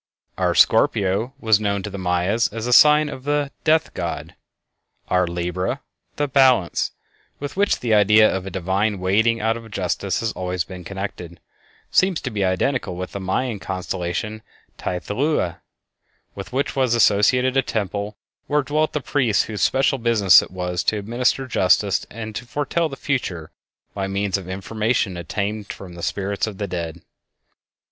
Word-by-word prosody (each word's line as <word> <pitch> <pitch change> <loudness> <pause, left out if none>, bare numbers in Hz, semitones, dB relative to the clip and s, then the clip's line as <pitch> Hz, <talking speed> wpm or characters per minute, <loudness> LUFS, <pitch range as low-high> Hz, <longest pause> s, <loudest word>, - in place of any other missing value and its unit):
Our - - 0
Scorpio 100 +7 +3
was 110 -4 +3
known 100 -2 -1
to 105 - -5
the 100 - -6
Mayas 90 +5 +1
as 110 +1 -5
a 125 - +1
sign 150 +3 +7
of 130 -3 -7
the 145 0 0
"Death 160 0 +2
God." 85 -2 -4 0.8
Our 90 -1 +2
Libra, 90 +1 -2 0.3
the 145 - 0
"Balance," 130 -9 +3 0.5
with 145 0 -6
which 200 +1 +1
the 115 -3 +1
idea 105 +1 +6
of 95 0 -2
a - - -3
divine 95 +3 -1
weighing 110 +5 +2
out 110 +1 +1
of 115 -1 -11
justice 95 -1 -2
has 115 -1 -1
always 90 -2 -2
been 90 +2 -10
connected, 95 -3 -6 0.5
seems 185 -3 +3
to 130 - -4
be 100 -2 -1
identical 95 +2 0
with 90 +1 -5
the 100 - -5
Mayan 105 +4 -2
constellation 95 +3 -4 0.4
Teoyaotlatohua, 105 - -1 0.7
with 100 -1 -8
which 135 +3 -1
was 130 -3 +2
associated 125 +4 +3
a 135 - +5
temple 105 -3 -3 0.3
where 150 0 +2
dwelt 155 +3 0
the 150 - -1
priests 130 -5 +1
whose 105 -2 -5
special 135 0 +2
business 110 -5 +6
it - - -8
was 90 -2 -3
to 110 - +2
administer 120 +5 0
justice 100 -3 +2
and 110 0 -7
to 125 - -6
foretell 150 +5 -1
the 135 - -7
future 95 - -3 0.4
by 95 -1 -3
means 100 0 -1
of 95 -2 -4
information 105 +1 -1
obtained 100 +4 -3
from 90 -3 -10
the 85 - -9
spirits 100 +4 -2
of 105 -3 -7
the 105 - -2
dead. 85 -3 -5
105 Hz, 165 wpm, -22 LUFS, 95-125 Hz, 0.8 s, sign